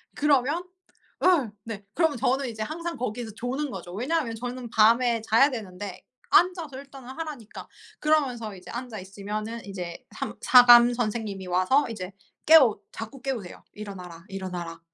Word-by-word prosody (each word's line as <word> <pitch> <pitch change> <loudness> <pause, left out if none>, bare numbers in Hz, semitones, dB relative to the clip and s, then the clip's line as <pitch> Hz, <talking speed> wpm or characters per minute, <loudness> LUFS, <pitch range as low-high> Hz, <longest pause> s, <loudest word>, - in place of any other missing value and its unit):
그러면 295 +3 +2 0.6
어 305 - +3
네. 210 -3 -7
그러면 320 -6 +1
저는 260 +3 +1
이제 220 -1 -4
항상 335 +6 -5
거기에서 235 -2 -4
조는 260 +4 -3
거죠. 175 0 -8
왜냐하면 250 - -1
저는 245 +1 -6
밤에 230 +1 +4
자야 230 +6 +4
되는데 200 -4 -7 0.3
앉아서 350 -7 +3
일단은 270 -2 -11
하라니까. 285 -6 -8 0.3
그러면서 255 -9 0
이제 180 -1 -11
앉아 240 -3 -6
있으면은 210 +4 -6
인제 180 -4 -7
삼 - - -5
사감 245 -1 +8
선생님이 215 -5 -3
와서 185 +11 +2
이제 190 -4 -6 0.3
깨우 290 -9 +7
자꾸 225 +4 -8
깨우세요. 235 -10 -5
'일어나라, 180 -5 -9
일어나라.' 180 -3 -6
235 Hz, 345 characters per minute, -26 LUFS, 205-270 Hz, 0.6 s, 사감